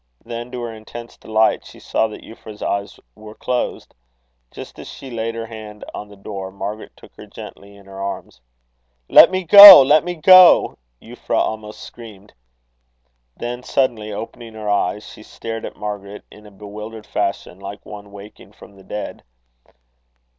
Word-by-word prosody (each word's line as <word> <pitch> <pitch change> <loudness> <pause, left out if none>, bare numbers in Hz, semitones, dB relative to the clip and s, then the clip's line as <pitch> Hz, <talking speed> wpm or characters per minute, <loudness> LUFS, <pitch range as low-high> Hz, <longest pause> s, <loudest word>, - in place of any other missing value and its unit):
Then, 120 +1 -7
to 125 -1 -6
her 115 -1 -6
intense 115 +2 -11
delight, 110 0 0
she - - -15
saw 110 - -1
that 110 - -12
Euphra's 110 -1 -12
eyes 100 0 -4
were 105 - -14
closed. 125 -1 -4 0.6
Just - - -12
as - - -10
she 135 - -11
laid 115 0 -4
her 115 0 -5
hand 110 -2 -11
on 105 - -8
the 105 - -16
door, 100 -1 -8
Margaret 100 +2 -7
took - - -18
her - - -13
gently 100 0 -13
in 100 -1 -18
her 95 0 -11
arms. 100 -8 -7 0.7
"Let - - +8
me 185 0 -3
go, 200 0 +12
let 150 +4 +3
me 175 +1 -5
go!" 185 +2 +6 0.2
Euphra - - -5
almost 110 -1 -4
screamed. 105 -4 -14 1.0
Then 120 +1 -6
suddenly 120 -5 -2
opening 115 +2 -9
her 105 -1 -4
eyes, 100 +1 -2
she - - -13
stared 115 +1 -8
at - - -12
Margaret 105 -1 -8
in 105 0 -16
a - - -16
bewildered 105 +2 -10
fashion, 100 -2 -4
like 100 +1 -10
one 105 -1 -12
waking 100 +1 -14
from 100 - -17
the 95 - -17
dead. 105 +2 -8
110 Hz, 165 wpm, -19 LUFS, 100-115 Hz, 1.0 s, go